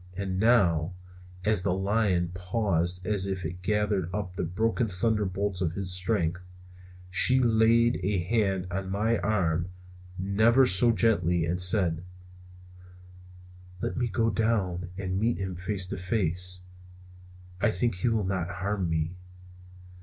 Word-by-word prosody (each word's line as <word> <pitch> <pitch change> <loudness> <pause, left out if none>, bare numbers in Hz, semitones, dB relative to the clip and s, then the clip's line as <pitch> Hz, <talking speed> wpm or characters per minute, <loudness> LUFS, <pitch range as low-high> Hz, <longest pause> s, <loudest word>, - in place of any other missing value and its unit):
And 95 -1 -3
now, 90 -7 +3 0.5
as 105 -3 +2
the 90 -1 0
lion 95 -3 +1
paused 90 -2 -1
as 100 -1 0
if 95 -2 -3
to 80 - -3
gather 100 0 -1
up 95 -2 -4
the - - -3
broken 110 +7 0
thunderbolts 100 -1 -1
of 85 -3 0
his 95 0 -3
strength, 90 -2 0 0.7
she 125 +9 +5
laid 115 -1 +3
a 95 +2 0
hand 95 -2 0
on 95 +1 -3
my 110 +4 0
arm, 90 -5 0 0.5
never 110 +7 +3
so 115 +3 +4
gently, 90 -6 +2
and 90 +2 -1
said: 90 -3 +2 1.8
"Let - - -3
me 125 -1 0
go 115 +2 0
down 95 -6 -1
and 95 -1 -2
meet 115 +3 +1
him 95 -2 -4
face 95 +1 -1
to 100 - -4
face. 90 -1 -1 1.0
I - - +3
think 110 +3 0
he 90 - -1
will 110 -3 0
not 90 -2 -2
harm 95 0 -2
me." 80 0 -1
95 Hz, 140 wpm, -27 LUFS, 90-110 Hz, 1.8 s, she